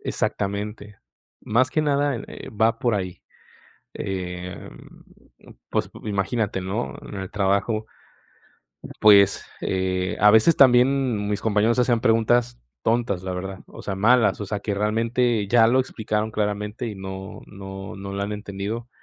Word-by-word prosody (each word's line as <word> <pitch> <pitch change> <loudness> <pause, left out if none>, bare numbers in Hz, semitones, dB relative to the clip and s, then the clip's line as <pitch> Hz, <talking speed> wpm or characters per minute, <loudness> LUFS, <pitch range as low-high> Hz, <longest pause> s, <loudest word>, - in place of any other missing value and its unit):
Exactamente. 105 +1 -3 0.4
Más 130 +4 +1
que 155 - +1
nada, 145 -2 +1
eh, - - -9
va 110 +2 +1
por 120 -3 +1
ahí, 95 -2 -5 0.7
em, 90 -1 -6 0.9
pues, - - -1
imagínate, 100 0 -1
¿no? 100 +6 -3
En - - -9
el 95 -1 -5
trabajo, 100 +3 0 1.1
pues, 100 -2 +6 0.2
eh, 95 0 -1
a 105 +1 +7
veces, 110 +9 +5
también 125 -4 +4
mis 105 - -1
compañeros 110 +2 +2
hacían 120 -2 +2
preguntas 120 +2 +2 0.2
tontas, 115 -5 0
la 95 - -3
verdad, 95 +1 -6
o - - -12
sea, 100 - -3
malas. 115 +1 +3
O 105 - -4
sea, 105 0 -3
que 105 - -2
realmente, 115 +1 +1
ya 115 -1 +5
lo 130 +2 +4
explicaron 110 -3 -2
claramente, 105 +2 -2
y 110 - -5
no 95 0 -7
no 95 -1 -8
no 100 0 -7
lo 100 - -2
han 100 - -3
entendido, 105 +3 -5
105 Hz, 140 wpm, -23 LUFS, 100-115 Hz, 1.1 s, a